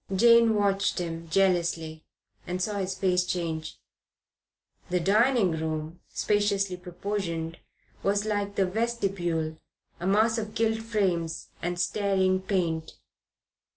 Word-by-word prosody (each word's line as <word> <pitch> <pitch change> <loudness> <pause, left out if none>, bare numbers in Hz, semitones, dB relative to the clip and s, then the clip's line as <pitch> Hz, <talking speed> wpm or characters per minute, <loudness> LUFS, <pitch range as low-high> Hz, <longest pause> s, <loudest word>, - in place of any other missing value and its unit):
Jane 230 +1 +6
watched 200 -1 +1
him 165 -2 -4
jealously 165 -4 +1 0.4
and 180 +1 -2
saw 205 +2 -1
his 190 0 -2
face 180 -2 +2
change. 165 -3 -3 1.1
The 180 0 +1
dining 215 +2 +3
room, 160 +1 -3
spaciously 200 -2 +1
proportioned, 180 -2 -4 0.4
was, 205 +1 +1
like 205 -1 -1
the 195 - +3
vestibule, 185 -7 -1 0.4
a 175 - -3
mass 220 +3 +3
of 215 0 -6
gilt 225 -1 +1
frames 185 -8 -1
and 175 0 -2
staring 190 0 +1
paint. 170 -5 -1
190 Hz, 115 wpm, -27 LUFS, 170-205 Hz, 1.1 s, Jane